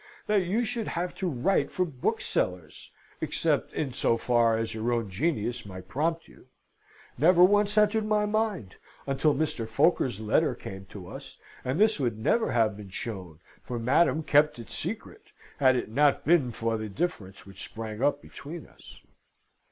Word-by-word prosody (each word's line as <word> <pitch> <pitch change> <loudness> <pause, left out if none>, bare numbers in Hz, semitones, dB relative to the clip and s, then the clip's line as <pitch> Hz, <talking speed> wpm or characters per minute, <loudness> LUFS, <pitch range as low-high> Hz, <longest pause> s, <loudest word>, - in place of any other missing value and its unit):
that 210 -2 +2
you 220 +7 0
should 225 0 -3
have 175 +1 -2
to 190 -2 -2
write 140 +7 +1
for 185 - 0
booksellers 90 - -2 0.3
(except - - 0
in 140 -5 -3
so 115 - +1
far 115 -1 +2
as 115 0 -2
your 110 +2 -1
own 115 -4 -1
genius 120 - -1
might 95 -2 -10
prompt 165 - -1
you), - - -19 0.7
never 175 +4 +6
once 205 +2 +4
entered 210 +1 +4
my 210 -1 +2
mind, 210 - -1 0.3
until 140 +2 +2
Mr. 135 -7 -2
Foker's 120 - +2
letter 110 -1 +2
came 95 0 -9
to 95 -2 -10
us, - - -10 0.3
and 130 +6 -1
this 215 -4 +4
would 120 -5 -1
never 220 - +1
have 110 -4 +2
been 100 -1 -10
shown 95 -6 -6 0.2
for 125 - -5
Madam 150 +7 +2
kept 150 0 +3
it 115 - -10
secret 225 - -5 0.3
had 130 -2 +5
it 120 -3 -3
not 145 +3 +3
been 150 -7 +3
for 115 0 -1
the 110 -1 -5
difference 100 - -4
which 100 -1 -9
sprang 110 0 -7
up 145 +1 +1
between 160 +3 -9
us. - - -16
130 Hz, 165 wpm, -28 LUFS, 110-175 Hz, 0.7 s, never